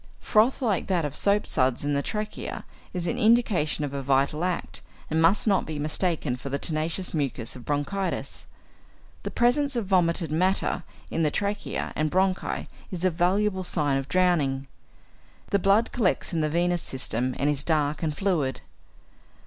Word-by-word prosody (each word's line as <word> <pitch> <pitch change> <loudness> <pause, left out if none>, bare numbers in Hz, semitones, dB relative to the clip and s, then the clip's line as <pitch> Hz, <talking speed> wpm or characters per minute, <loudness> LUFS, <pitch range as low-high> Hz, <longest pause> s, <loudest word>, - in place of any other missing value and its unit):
Froth 230 +5 +2
like 210 -7 0
that 175 -5 +1
of 145 -1 -3
soap 205 +1 +3
suds 130 +1 +1
in 145 - +1
the 140 - +1
trachea 210 +6 -4 0.3
is 180 -2 -3
an - - -1
indication 215 -10 +3
of 140 - -6
a 140 - -2
vital 140 +4 +1
act, 180 -1 -2 0.3
and 160 +1 +2
must 170 +5 +4
not 200 -3 +3
be 155 -1 -5
mistaken 155 -2 0
for 125 +2 -7
the 140 - -1
tenacious 160 +5 -2
mucus 135 -7 -2
of 125 - -11
bronchitis. 150 +7 -2 0.7
The - - -4
presence 275 +3 +2
of 235 -3 -1
vomited 170 -4 +1
matters 185 +5 +1 0.3
in 165 - 0
the 155 - +3
trachea 205 +4 -2
and 155 0 +1
bronchi 190 0 0 0.2
is 180 -1 -3
a 185 - +4
valuable 190 +3 +1
sign 145 -6 +1
of 135 +1 -7
drowning. 145 -6 +2 0.8
The 200 - +3
blood 200 +4 +3
collects 195 -5 0
in 165 - +1
the 155 - +1
venous 175 +2 +1
system, 125 -1 -2
and 140 - 0
is 145 -2 +2
dark 150 -2 +1
and 155 -3 -2
fluid. 165 -10 0
170 Hz, 170 wpm, -26 LUFS, 145-195 Hz, 0.8 s, must